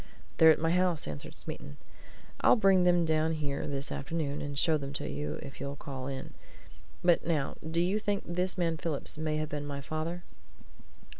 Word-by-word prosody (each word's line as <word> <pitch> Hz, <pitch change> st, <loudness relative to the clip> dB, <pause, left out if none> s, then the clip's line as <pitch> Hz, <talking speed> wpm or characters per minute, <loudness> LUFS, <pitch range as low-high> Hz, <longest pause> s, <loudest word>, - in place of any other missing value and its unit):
"They're 160 Hz, -, +8 dB
at 160 Hz, -, +7 dB
my 165 Hz, +1 st, +1 dB
house," 180 Hz, -2 st, +2 dB
answered 75 Hz, -2 st, -6 dB
Smeaton. 70 Hz, -, -7 dB, 0.6 s
"I'll -, -, +7 dB
bring 195 Hz, -5 st, +5 dB
them 175 Hz, -1 st, +4 dB
down 160 Hz, 0 st, +2 dB
here 145 Hz, -3 st, -2 dB
this 140 Hz, -1 st, -2 dB
afternoon, 145 Hz, -1 st, -2 dB
and 145 Hz, -1 st, -4 dB
show 160 Hz, +3 st, +4 dB
them 140 Hz, -2 st, -3 dB
to 140 Hz, -, -3 dB
you 75 Hz, +3 st, -3 dB
if 135 Hz, -, -9 dB
you'll 140 Hz, 0 st, -3 dB
call 135 Hz, -2 st, -6 dB
in. 135 Hz, -1 st, -5 dB, 0.7 s
But 175 Hz, -1 st, +4 dB
now 150 Hz, -5 st, +1 dB, 0.2 s
do 165 Hz, +1 st, +1 dB
you 185 Hz, +5 st, +2 dB
think 205 Hz, -1 st, -1 dB
this 180 Hz, +2 st, 0 dB
man 165 Hz, -2 st, +1 dB
Phillips 155 Hz, -1 st, -2 dB
may 155 Hz, -1 st, 0 dB
have 155 Hz, 0 st, -2 dB
been 145 Hz, -1 st, -4 dB
my 140 Hz, -1 st, -4 dB
father?" 155 Hz, +5 st, -4 dB
155 Hz, 190 wpm, -31 LUFS, 140-175 Hz, 0.7 s, They're